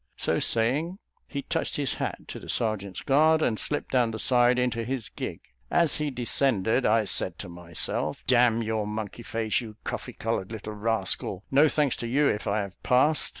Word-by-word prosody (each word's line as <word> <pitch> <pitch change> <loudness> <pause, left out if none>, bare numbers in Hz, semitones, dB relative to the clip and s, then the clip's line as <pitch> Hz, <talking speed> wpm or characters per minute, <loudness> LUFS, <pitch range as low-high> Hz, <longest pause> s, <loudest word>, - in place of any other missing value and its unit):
So - - 0
saying, 140 +11 0 0.3
he 140 -1 -4
touched - - -2
his 140 -3 -1
hat - - -3
to - - -6
the - - -11
serjeant's 100 -4 -1
guard, 155 +3 +4
and 110 -3 +1
slipped 145 - -2
down 125 -3 +3
the 110 - -4
side 125 +1 +4
into 125 -2 0
his 120 -2 -3
gig. - - -6 0.3
As 170 -3 +2
he 150 -1 -1
descended, 125 -2 +1
I 110 0 +3
said 90 -2 -1
to 100 - -7
myself, 85 -1 -4
"D 125 - +4
n 120 -1 +4
your 110 -1 -1
monkey 105 +2 -5
face, 115 -1 -1
you 110 -3 -9
coffee - - -5
coloured 115 -3 -2
little 110 -1 -6
rascal 105 -3 -1
no 145 +3 +6
thanks 150 -3 +1
to 120 - -4
you 140 +5 +3
if 105 - -1
I 105 +1 +1
have 100 -1 -8
passed. 145 +5 +3
115 Hz, 195 wpm, -27 LUFS, 105-135 Hz, 0.3 s, no